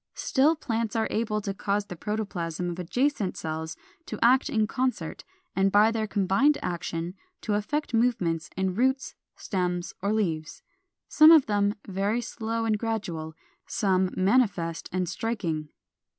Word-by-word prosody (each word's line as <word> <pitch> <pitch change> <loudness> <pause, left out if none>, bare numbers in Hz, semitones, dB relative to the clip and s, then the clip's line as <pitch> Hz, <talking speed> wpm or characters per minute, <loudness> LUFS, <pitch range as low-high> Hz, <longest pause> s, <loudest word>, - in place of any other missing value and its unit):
Still 290 +4 +3
plants 230 -7 -2
are 225 -1 +1
able 215 -1 -1
to 200 -1 -3
cause 200 +1 -1
the 180 - -8
protoplasm 180 -4 -3
of 175 - -7
adjacent 235 - 0
cells 160 0 -4 0.3
to - - -5
act 255 +3 +4
in 220 -1 +2
concert, 255 +3 -2 0.3
and 195 0 +3
by 210 +3 +5
their 220 -1 -1
combined 205 +9 +3
action 170 0 -3 0.3
to 215 - -1
effect 240 +8 -2
movements 220 -9 +1
in 190 -1 0
roots, 260 +6 +1 0.2
stems, 180 -2 -2
or 200 +2 0
leaves, 165 -8 -2 0.4
some 310 +1 +7
of 320 -4 +8
them 205 0 +1
very 200 +4 0
slow 230 -1 -3
and 215 -2 +1
gradual, 175 -9 -3 0.3
some 190 -3 +1
manifest 190 -5 +1
and 185 0 -1
striking. 175 -7 -3
205 Hz, 145 wpm, -27 LUFS, 180-230 Hz, 0.4 s, of